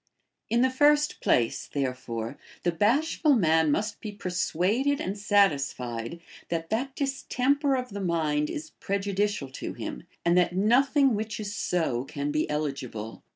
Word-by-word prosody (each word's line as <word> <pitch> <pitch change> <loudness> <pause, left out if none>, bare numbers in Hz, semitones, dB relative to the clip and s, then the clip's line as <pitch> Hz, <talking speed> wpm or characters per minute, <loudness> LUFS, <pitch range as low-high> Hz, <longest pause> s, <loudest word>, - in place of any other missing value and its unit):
In 235 +1 +3
the 260 0 +3
first 295 +2 +3
place, 115 -2 +1
therefore, 125 -3 -3 0.2
the 175 - +2
bashful 275 - +2
man 160 -6 +3
must 210 +7 -1
be 215 - -5
persuaded 205 - 0
and 190 - -3
satisfied 140 - +1 0.3
that 165 -1 -3
that 260 +4 -1
distemper 275 0 +1
of 255 -1 -3
the 200 -1 -5
mind 155 -4 0
is 310 +1 -6
prejudicial 200 -5 -1
to 130 - -6
him, 60 - -7 0.2
and 170 0 +4
that 175 0 +1
nothing 260 +6 +4
which 215 +1 -3
is 205 -1 -4
so 160 -12 0
can 140 +1 -3
be 155 +1 0
eligible. 135 -7 -4
195 Hz, 145 wpm, -27 LUFS, 150-250 Hz, 0.3 s, and